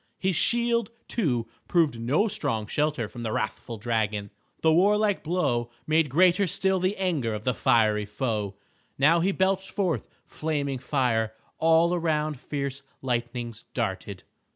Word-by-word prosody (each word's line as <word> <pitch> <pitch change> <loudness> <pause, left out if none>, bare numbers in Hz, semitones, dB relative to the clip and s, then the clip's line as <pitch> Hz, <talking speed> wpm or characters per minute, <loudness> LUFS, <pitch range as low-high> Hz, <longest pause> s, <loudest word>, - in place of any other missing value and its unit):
His 190 -1 0
shield, 235 +3 +2 0.2
too, 125 - 0 0.2
proved 160 -9 +2
no 140 - +2
strong 140 - -1
shelter 145 -1 0
from 120 +3 -9
the 115 -2 -2
wrathful 115 +1 -3
dragon. 105 -2 -1 0.3
The 160 -1 +4
warlike 205 +3 +3
blow 135 -9 0 0.2
made 155 -1 +2
greater 180 +6 +4
still 190 +3 +1
the 185 +3 0
anger 155 - 0
of 105 - -6
the 125 - +1
fiery 110 -4 +3
foe. 105 -3 -2 0.4
Now 155 +5 +5
he 185 +4 +2
belched 190 0 0
forth 175 - -1 0.2
flaming 145 -4 -2
fire. 115 -5 0 0.2
All 165 +2 +4
around 155 -4 0
fierce 140 -1 -4 0.2
lightnings 120 -2 -3
darted. 100 -4 -3
140 Hz, 140 wpm, -26 LUFS, 115-180 Hz, 0.4 s, Now